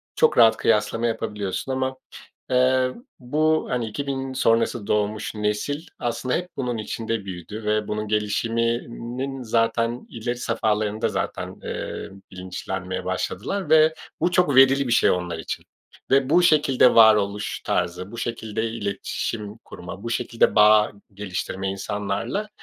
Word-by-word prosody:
çok 470 Hz, -, +3 dB
rahat 110 Hz, -1 st, +7 dB
kıyaslama 115 Hz, +1 st, +1 dB
yapabiliyorsun 105 Hz, +1 st, -3 dB
ama, 130 Hz, 0 st, -1 dB, 0.5 s
eee, 130 Hz, 0 st, +3 dB, 0.3 s
bu, 155 Hz, +5 st, +1 dB
hani, 125 Hz, -2 st, -1 dB
2000 135 Hz, +3 st, -4 dB
sonrası 115 Hz, -3 st, +1 dB
doğmuş 105 Hz, +1 st, -1 dB
nesil 105 Hz, +9 st, -2 dB
aslında 120 Hz, +1 st, -1 dB
hep 180 Hz, +1 st, -3 dB
bunun 125 Hz, -3 st, -2 dB
içinde 110 Hz, -1 st, -3 dB
büyüdü 95 Hz, +4 st, -7 dB
ve 105 Hz, 0 st, 0 dB
bunun 105 Hz, 0 st, -3 dB
gelişiminin 115 Hz, +4 st, -2 dB
zaten 115 Hz, +1 st, 0 dB
ileri 120 Hz, +2 st, -3 dB
safhalarında 110 Hz, -2 st, 0 dB
zaten, -, -, -3 dB
eee, -, -, -5 dB, 0.2 s
bilinçlenmeye 95 Hz, 0 st, -5 dB
başladılar 155 Hz, -, -3 dB
ve 160 Hz, 0 st, +6 dB, 0.3 s
bu 175 Hz, +2 st, +2 dB
çok 175 Hz, -6 st, +3 dB
verili 135 Hz, 0 st, +6 dB
bir 120 Hz, -, +2 dB
şey -, -, +4 dB
onlar 90 Hz, -2 st, -1 dB
için -, -, -5 dB, 0.5 s
ve 135 Hz, 0 st, +4 dB
bu 175 Hz, +4 st, +5 dB
şekilde 145 Hz, -6 st, +4 dB
varoluş 105 Hz, -2 st, +4 dB
tarzı, 90 Hz, +2 st, -2 dB
bu 115 Hz, -, -8 dB
şekilde 110 Hz, -2 st, -3 dB
iletişim 105 Hz, 0 st, -4 dB
kurma, 95 Hz, -2 st, -10 dB
bu 115 Hz, -, -4 dB
şekilde 115 Hz, 0 st, +1 dB
bağ 105 Hz, 0 st, +6 dB, 0.2 s
geliştirme 95 Hz, -1 st, -4 dB
insanlarla 105 Hz, -, -3 dB
115 Hz, 130 wpm, -24 LUFS, 105-130 Hz, 0.5 s, rahat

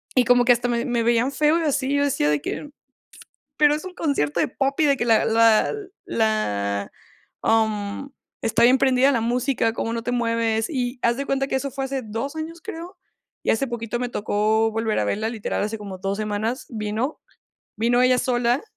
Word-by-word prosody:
Y 255 Hz, -2 st, +4 dB
como 245 Hz, 0 st, +4 dB
que 245 Hz, -, +7 dB
hasta 240 Hz, +1 st, -1 dB
me 235 Hz, +1 st, 0 dB
me 240 Hz, -2 st, 0 dB
veían 235 Hz, +3 st, +2 dB
feo 305 Hz, +3 st, +2 dB
y -, -, -2 dB
así, 280 Hz, -2 st, 0 dB
yo 285 Hz, -, +2 dB
decía 200 Hz, -, +1 dB
de 150 Hz, -1 st, +1 dB
que: 295 Hz, -, -5 dB, 0.9 s
"Pero 295 Hz, -1 st, +5 dB
es 310 Hz, +4 st, -6 dB
un 370 Hz, -, -7 dB
concierto 275 Hz, -, 0 dB
de -, -, +1 dB
Poppy, 275 Hz, +4 st, 0 dB
de 280 Hz, -1 st, +3 dB
que 240 Hz, -, -1 dB
la 225 Hz, -2 st, +4 dB
la 225 Hz, -, +4 dB, 0.3 s
la 100 Hz, -, -1 dB, 0.5 s
am, 220 Hz, +3 st, 0 dB, 0.3 s
está 225 Hz, +1 st, +2 dB
bien 250 Hz, +2 st, +6 dB
prendida 265 Hz, +1 st, +3 dB
la 235 Hz, -4 st, +1 dB
música, 235 Hz, 0 st, 0 dB
¿cómo 230 Hz, 0 st, -3 dB
no 230 Hz, 0 st, -3 dB
te 245 Hz, -, -2 dB
mueves?". 230 Hz, -2 st, 0 dB
Y 250 Hz, -4 st, -3 dB
haz 235 Hz, +1 st, +2 dB
de 275 Hz, -, -3 dB
cuenta 270 Hz, -1 st, 0 dB
que -, -, -2 dB
eso 275 Hz, +1 st, -2 dB
fue 270 Hz, +1 st, -3 dB
hace 270 Hz, -1 st, -3 dB
2 225 Hz, +7 st, -5 dB
años, 325 Hz, +2 st, -6 dB
creo. 340 Hz, +2 st, -8 dB, 0.5 s
Y -, -, -1 dB
hace 225 Hz, +5 st, +2 dB
poquito 235 Hz, -1 st, -4 dB
me 250 Hz, -, -1 dB
tocó 220 Hz, +1 st, +1 dB
volver 225 Hz, 0 st, -1 dB
a -, -, +1 dB
verla. 215 Hz, -, -1 dB
Literal, 225 Hz, -3 st, -3 dB
hace 215 Hz, +2 st, -3 dB
como 200 Hz, -2 st, -7 dB
2 195 Hz, +2 st, -2 dB
semanas 215 Hz, +4 st, -3 dB
vino 220 Hz, +5 st, -3 dB, 0.6 s
vino 240 Hz, +3 st, +2 dB
ella 255 Hz, 0 st, +4 dB
sola 245 Hz, +1 st, +1 dB
235 Hz, 200 wpm, -23 LUFS, 220-270 Hz, 0.9 s, que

